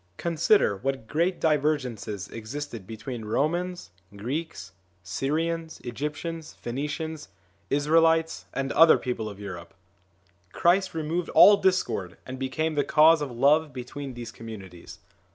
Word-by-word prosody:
Consider 170 - +2
what 135 +1 -3
great 170 +8 0
divergences 130 - 0
existed 115 -2 -7
be 110 - -7
tween 120 0 -6
Romans, 170 - -1 0.3
Greeks, 125 - -5 0.3
Syrians, 160 - -2
Egyptians, 150 +6 -5
Phoenicians, 150 +5 -5 0.4
Israelites, 160 +3 +2
and 135 0 -2
other 165 +1 +7
peoples 120 -4 -3
of 100 -1 -10
Europe. 90 -4 -8 0.8
Christ 185 +1 +2
removed 165 +2 -2
all 205 - +9
discord, 100 - 0
and 130 0 -7
became 155 +5 -1
the 145 -1 +1
cause 160 +1 +5
of 145 - -2
love 145 +5 +3
between 130 +1 -7
these 120 -1 -7
communities. 100 -6 -10
145 Hz, 120 wpm, -26 LUFS, 115-160 Hz, 0.8 s, all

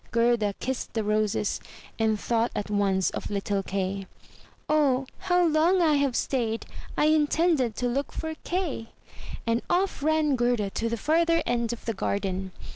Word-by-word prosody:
Gerda 230 -3 +2
kissed 260 0 -3
the 220 - +1
roses, 210 -1 0 0.4
and 220 -1 +2
thought 230 +1 +1
at 210 0 -3
once 195 -2 +2
of - - -5
little 200 0 -1
Kay. 195 0 -3 0.6
"O 280 -4 +3
how 355 0 +2
long 330 +4 +3
I 325 -3 +4
have 280 -3 +1
stayed! 230 -4 -1 0.3
I - - +3
intended 305 -5 +2
to 245 - -1
look 275 +4 -1
for 320 0 -4
Kay!" 340 -11 -2 0.6
And 230 0 +1
off 370 -2 +1
ran 310 -1 +2
Gerda 240 -5 +1
to 230 +3 -2
the 235 - -2
further 330 +5 +2
end 235 -1 0
of 240 - -7
the 225 - -1
garden. 190 -2 -2
240 Hz, 160 wpm, -27 LUFS, 210-305 Hz, 0.6 s, I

